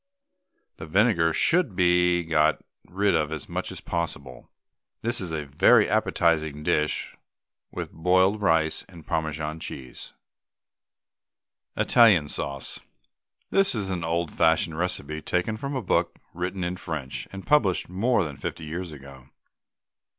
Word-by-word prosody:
The 80 - -8
vinegar 90 -2 +3
should 160 - +2
be 90 -1 +3
got 80 -1 +2 0.3
rid 100 +2 +1
of 75 -1 0
as 80 -3 -5
much - - -4
as - - -8
possible. 75 -6 -5 0.5
This 120 0 0
is 90 -3 -5
a 75 -2 -3
very 70 +1 +4
appetising 80 -3 +1
dish 75 0 0 0.5
with - - -6
boiled 95 +5 +2
rice 80 -5 +2
and 85 -4 -13
Parmesan 80 0 -3
cheese. 65 -5 -9 1.6
ITALIAN 100 -11 +5
SAUCE. 70 -1 -3 0.7
This 195 -7 +4
is 100 -3 -2
an 90 -3 -3
old 85 0 -1
fashioned 80 +1 +2
recipe 75 -4 -3
taken 90 +7 -1
from 140 +5 -5
a 130 - -2
book 85 -2 0 0.2
written 90 +2 -3
in 90 +1 -3
French, 75 -7 -5
and 95 0 -8
published 110 -12 +2
more 100 +5 +1
than 75 -4 -6
fifty - - -5
years 85 +3 -5
ago. 70 -3 -13
85 Hz, 135 wpm, -25 LUFS, 80-95 Hz, 1.6 s, ITALIAN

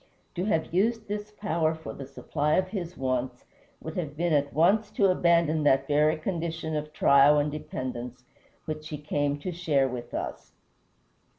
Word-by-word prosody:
To 180 +1 -2
have 160 -6 0
used 220 +4 +1
this 210 +1 -4
power 165 -7 -1
for 160 -1 -8
the 135 - -8
supply 150 +2 -1
of 185 0 +1
his 180 -4 -5
wants 130 -1 -2 0.3
would 160 - -7
have 150 -4 -4
been 170 0 +1
at 145 -1 +2
once 200 +7 +3
to 195 -2 +4
abandon 170 -3 +3
that 135 -2 +3
very 150 +2 +3
condition 165 -1 -3
of 150 0 -3
trial 145 -1 +5
and 145 0 +1
dependence 125 -4 -6 0.4
which 155 0 -5
he 150 - -4
came 145 -1 -1
to 165 +5 -5
share 155 -6 +1
with 125 -2 -6
us. - - -5
155 Hz, 170 wpm, -27 LUFS, 145-175 Hz, 0.4 s, trial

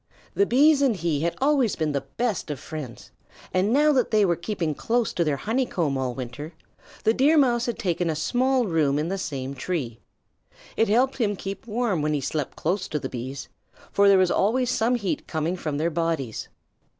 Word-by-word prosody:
The 400 - +2
Bees 285 +3 +5
and 265 -5 +3
he 165 -5 -1
had 170 +2 -1
always 270 -5 +2
been 155 -2 -1
the 140 -1 -1
best 200 - -3
of 145 -3 -4
friends, 145 -5 -8 0.4
and 185 +3 +2
now 300 +4 +4
that 255 -3 +2
they 215 -2 +4
were 175 -2 +2
keeping 170 -3 -2
close 235 - 0
to 170 - +1
their 150 -3 0
honeycomb 190 - -1
all 130 -2 -2
winter, 135 +6 -7 0.5
the 220 - +4
Deer 285 +6 +4
Mouse 245 -4 +3
had 240 - -2
taken 180 -5 -1
a 160 - -1
small 250 - +1
room 155 -6 +1
in 155 +3 -1
the 195 +1 -2
same 135 -6 -4
tree. 130 -5 -4 0.8
It 225 - +2
helped 255 +5 +2
to 210 -5 0
keep 195 +2 -6
him 210 - -8
warm 230 -9 +1
when 150 0 0
he 145 - -1
slept 145 +1 -3
close 185 +4 -1
to 150 - -2
the - - -4
Bees, 130 +3 -6 0.4
for 200 0 +4
there 200 -1 +7
was 185 -1 +3
always 245 +5 +2
some 240 +1 +2
heat 205 -6 -3
coming 160 +2 -1
from 155 -5 -3
their 165 +3 0
bodies. 160 -8 -2
180 Hz, 205 wpm, -25 LUFS, 150-235 Hz, 0.8 s, there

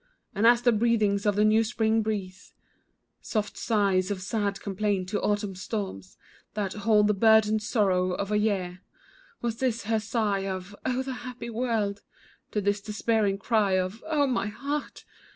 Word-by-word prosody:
And 215 +2 +3
as 240 0 +5
the 240 - +5
breathings 215 -3 +2
of 205 - +2
the 210 +1 +3
new 220 +1 +4
spring 220 0 +1
breeze, 200 -3 -5 0.7
Soft 210 -2 -2
sights 195 -5 +1
of 200 -2 -2
sad 200 +1 -2
complaint, 200 -2 -1
to 205 - -1
autumn's 205 -3 -1
storms 190 - -5 0.4
That 200 -3 -2
hold 210 0 +3
the 210 - +3
burdened 220 +1 +4
sorrow 190 -4 +1
of 200 +2 -3
a 210 - +3
year, 185 -4 -1 0.6
Was 230 -1 -1
this, 235 -3 -1
her 220 +1 +1
sigh 210 -3 -1
of, 190 +1 -5
"oh, 255 +1 0
the 265 0 -4
happy 245 -1 -7
world!" 220 -4 -1 0.5
To 210 - -1
this 205 0 0
despairing 210 -1 0
cry 205 -1 +1
of, 185 +4 -1
"oh, 300 -3 +2
my 245 -6 0
heart!" 280 +7 -5
210 Hz, 165 wpm, -27 LUFS, 200-225 Hz, 0.7 s, as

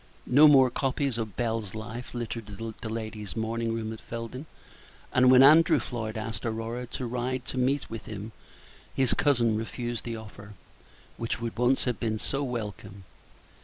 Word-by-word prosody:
No 145 +5 +7
more 135 -4 +6
copies 135 -1 -1
of 110 -4 -4
Bell's 110 -4 -2
Life 115 +3 -7
littered 115 -2 -4 0.3
the 115 - -4
ladies' 110 -2 -5
morning 115 +1 -1
room 110 -1 -3
at 110 - -10
Felden; 115 +5 -6 0.7
and 130 0 +5
when 130 0 +8
Andrew 155 +4 +7
Floyd 110 -2 -4
asked 110 -1 -5
Aurora 115 +2 -3
to 125 - -5
ride 125 +1 -2
to 130 - -3
meet 135 +2 +1
with 115 -1 -8
him, 105 +1 -6 0.6
his 130 -2 +3
cousin 120 -6 +3
refused 120 +1 -4
the 115 -1 -4
offer, 105 -1 -11 0.6
which 115 0 -2
would 115 -1 -4
once 125 +2 +2
have 125 -4 -1
been 110 -2 -1
so 135 +5 -2
welcome. 105 -6 -5
115 Hz, 165 wpm, -28 LUFS, 110-125 Hz, 0.7 s, when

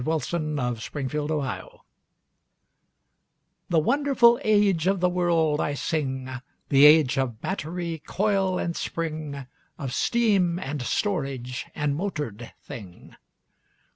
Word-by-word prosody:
THE 155 - -2
AGE 160 -1 -1
OF 170 -2 0
MOTORED 130 -2 -3 0.2
THINGS 145 -5 -3 2.0
The 170 - +2
wonderful 240 - +4
age 205 -6 +3
of 195 0 +2
the 180 - +3
world 170 -4 +1
I 145 - -1
sing— 130 -4 -2 0.4
The 140 0 +7
age 150 -3 +5
of 120 -5 -2
battery, 170 -3 -4
coil 195 -2 +1
and 170 -1 -2
spring, 155 -4 -4 0.3
Of 135 -5 -5
steam, 200 -8 +2
and 145 -5 -4
storage, 135 - -2
and 150 -1 0
motored 145 - -4
thing. 95 -6 -11
155 Hz, 115 wpm, -25 LUFS, 135-180 Hz, 2.0 s, The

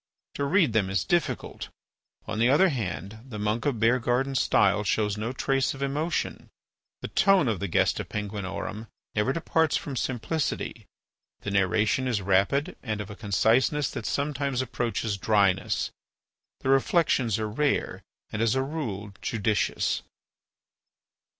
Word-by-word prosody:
To 140 - -2
read 160 - +3
them 100 -4 +2
is 95 -2 0
difficult. 175 -3 -1 0.6
On 110 - -4
the 120 +2 +4
other 160 +8 +5
hand, 100 - -4
the 125 -5 -8
monk 105 +6 -1
of 130 -6 0
Beargarden's 125 +3 +2
style 100 +1 +3
shows 105 0 +1
no 110 +3 -3
trace 135 +1 0
of 135 - -4
emotion. 150 +5 -2 0.5
The - - -4
tone 195 -8 +4
of 110 -6 0
the - - -2
"Gesta - - +1
Penguinorum" 105 +1 -5 0.3
never 105 +5 +1
departs 160 0 +1
from 140 - -5
simplicity. 130 +6 -2 0.5
The 100 - -4
narration 105 +6 +2
is 120 -5 +1
rapid 100 - +1
and 110 -4 -3
of 105 0 -6
a - - -8
conciseness 115 - +2
that 105 - -5
sometimes 140 -2 -1
approaches 115 -4 -2
dryness. 100 -2 +2 0.7
The - - -2
reflections 135 - +3
are 110 -1 -2
rare 145 +7 0 0.3
and, 110 - -2
as 115 +1 +2
a 130 - +1
rule, 110 -9 -4
judicious. 110 -2 0
115 Hz, 140 wpm, -27 LUFS, 105-140 Hz, 0.7 s, other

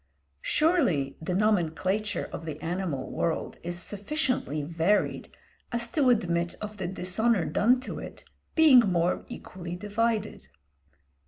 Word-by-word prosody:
Surely 255 - +2
the 175 +3 -2
nomenclature 205 +1 0
of - - -5
the 155 -1 -5
animal 175 -4 -3
world 165 - -2
is 175 0 -4
sufficiently 205 - -2
varied 170 +6 0 0.4
as 235 -1 -2
to 280 -5 +3
admit 170 -7 +1
of 210 0 -6
the 190 -3 -3
dishonour 190 +2 0
done 240 +10 +3
to 255 - -6
it - - -9 0.3
being 310 -6 +8
more 180 -6 +1
equally 175 -1 -7
divided. 210 - -1
195 Hz, 120 wpm, -28 LUFS, 170-235 Hz, 0.4 s, being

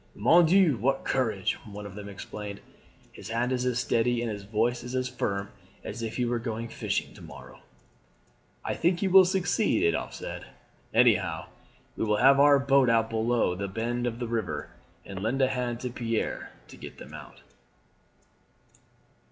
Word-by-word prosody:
"Mon 175 +1 +5
Dieu, 175 -6 +4
what 135 +5 0
courage!" 110 -8 0
one 105 -2 -9
of 100 - -8
them 105 0 -8
exclaimed. 100 +1 -7 0.5
"His 105 - -10
hand 120 +2 0
is 125 0 0
as 125 -2 0
steady, 120 0 +1
and 115 - -2
his 105 -1 -5
voice 115 +4 -1
as 125 +1 -2
firm 100 -5 -3 0.3
as 115 +3 -6
if 115 -1 -4
he 125 - 0
were 120 0 0
going 115 0 -4
fishing - - -3
to - - -14
morrow." - - -12 1.1
"I - - -1
think 175 +1 +1
he 200 - +2
will 190 0 +8
succeed;" 185 - +1
Adolphe 85 -1 -1
said, - - -7 0.4
"anyhow, - - +2 0.5
we - - -2
will 105 -1 +1
have 135 +3 +6
our 145 0 +7
boat 135 -2 +3
out 115 -1 +2
below 115 -3 +1
the 100 +2 -4
bend 120 +4 -2
of 115 -1 -3
the 120 -1 -4
river, 115 -4 -3 0.3
and 95 -1 -7
lend 115 +6 -1
a 130 -1 +3
hand 125 -2 -2
to 125 - -4
Pierre 115 -2 -3 0.2
to - - -12
get - - -10
them - - -12
out." - - -11
120 Hz, 175 wpm, -28 LUFS, 110-130 Hz, 1.1 s, will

